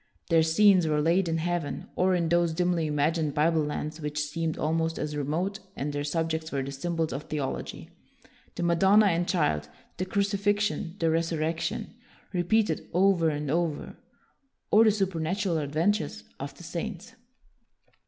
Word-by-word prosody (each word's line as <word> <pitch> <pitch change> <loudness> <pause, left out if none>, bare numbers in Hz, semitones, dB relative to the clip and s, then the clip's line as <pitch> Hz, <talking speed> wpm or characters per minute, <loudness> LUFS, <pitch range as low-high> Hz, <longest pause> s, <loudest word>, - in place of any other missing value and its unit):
Their 165 -1 +6
scenes 180 +2 +5
were 150 -1 +1
laid 170 +4 +2
in 165 - 0
heaven, 170 -2 -2
or 185 0 +3
in 170 -2 +1
those 170 -1 +2
dimly 175 -2 +1
imagined 150 0 0
Bible 155 +1 +3
lands 150 +2 -4
which 150 0 -4
seemed 160 +1 -3
almost 165 +1 0
as 150 0 -3
remote; 165 +8 -2 0.2
and 145 +1 -3
their 145 0 -2
sub 165 +2 -1
jects 160 0 -3
were 140 -1 -1
the 135 - -5
symbols 160 +1 -2
of 140 +3 -5
theology, 145 -3 -4 0.6
the 175 - -3
Madonna 190 +5 +5
and 175 -2 +1
Child, 75 - 0 0.3
the 185 - -1
crucifixion, 200 -2 0
the 165 -3 +1
resurrection, 165 0 -1 0.4
repeated 205 +5 +1
over 180 -2 +4
and 150 -2 -2
over, 165 -2 -1 0.8
or 220 +2 +7
the 215 - +6
supernatural 190 -2 -1
adventures 155 +4 0 0.2
of 140 0 -6
the - - -12
saints. 185 +6 -5
165 Hz, 155 wpm, -27 LUFS, 150-180 Hz, 0.8 s, or